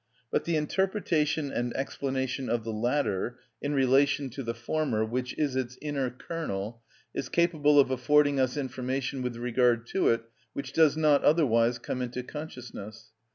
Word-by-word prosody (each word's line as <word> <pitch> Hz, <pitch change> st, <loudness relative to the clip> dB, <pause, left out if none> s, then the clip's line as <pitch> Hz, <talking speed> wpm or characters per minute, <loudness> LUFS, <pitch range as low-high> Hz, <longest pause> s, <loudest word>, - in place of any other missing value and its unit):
But -, -, 0 dB
the 170 Hz, -, 0 dB
interpretation 155 Hz, -3 st, 0 dB
and 120 Hz, 0 st, -2 dB
explanation 130 Hz, -1 st, -2 dB
of 115 Hz, -1 st, 0 dB
the 115 Hz, 0 st, -4 dB
latter, 120 Hz, -1 st, 0 dB, 0.2 s
in 145 Hz, 0 st, -1 dB
relation 135 Hz, +1 st, +3 dB
to 135 Hz, -, -6 dB
the 115 Hz, -2 st, -3 dB
former, 120 Hz, -2 st, 0 dB
which 125 Hz, +2 st, -3 dB
is 145 Hz, -4 st, 0 dB
its 130 Hz, -1 st, -2 dB
inner 140 Hz, -4 st, -1 dB
kernel, 120 Hz, -, -5 dB, 0.3 s
is -, -, -4 dB
capable 155 Hz, -4 st, +4 dB
of 135 Hz, -1 st, +4 dB
affording 145 Hz, +2 st, +3 dB
us 130 Hz, +2 st, +1 dB
information 130 Hz, 0 st, -2 dB
with 125 Hz, -1 st, -3 dB
regard 120 Hz, -1 st, +2 dB
to 190 Hz, -, +2 dB
it 115 Hz, 0 st, +2 dB, 0.3 s
which 135 Hz, -1 st, -5 dB
does 155 Hz, -1 st, +4 dB
not 150 Hz, -2 st, +4 dB
otherwise 120 Hz, -7 st, +4 dB
come 125 Hz, +1 st, -4 dB
into 125 Hz, 0 st, -3 dB
consciousness. 115 Hz, -7 st, -8 dB
130 Hz, 155 wpm, -28 LUFS, 120-150 Hz, 0.3 s, capable